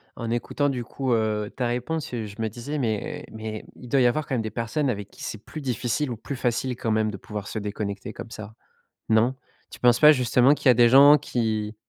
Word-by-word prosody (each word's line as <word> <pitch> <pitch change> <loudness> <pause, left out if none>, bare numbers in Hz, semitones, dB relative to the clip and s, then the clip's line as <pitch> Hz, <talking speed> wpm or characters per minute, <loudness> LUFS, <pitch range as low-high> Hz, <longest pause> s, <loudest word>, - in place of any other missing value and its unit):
en 115 -1 -5
écoutant 135 +4 0
du 125 -3 -3
coup, 130 +1 -2
heu, 110 -2 0
ta 125 -2 -1
réponse, 125 +5 -3
heu, 115 -2 -3
je 100 -1 -10
me 110 - 0
disais: 125 +7 -5
«Mais 110 -5 -2
mais 110 -1 -6
il 125 - -12
doit 135 -2 +3
y - - +4
avoir 155 +5 0
quand 135 - -1
même 115 - 0
des 110 -1 -5
personnes 120 +5 -1
avec 105 -3 -4
qui - - -12
c'est 110 -1 -6
plus 155 - -8
difficile 125 +2 -1
ou 115 - -4
plus 140 +4 -6
facile, 125 +1 -1
quand 115 -1 -2
même, 110 0 +1
de 100 - -7
pouvoir 105 +1 -7
se 110 - -4
déconnecter 105 0 -5
comme 115 0 -9
ça». 110 -1 -8 0.6
Non? 115 +4 +3 0.4
Tu - - -11
penses 120 -1 +4
pas 150 0 +9
justement 130 0 +4
qu'il 145 - -1
y - - +10
a - - +5
des 120 0 +6
gens 140 +4 +8
qui 110 -5 -2
120 Hz, 240 wpm, -25 LUFS, 110-130 Hz, 0.6 s, y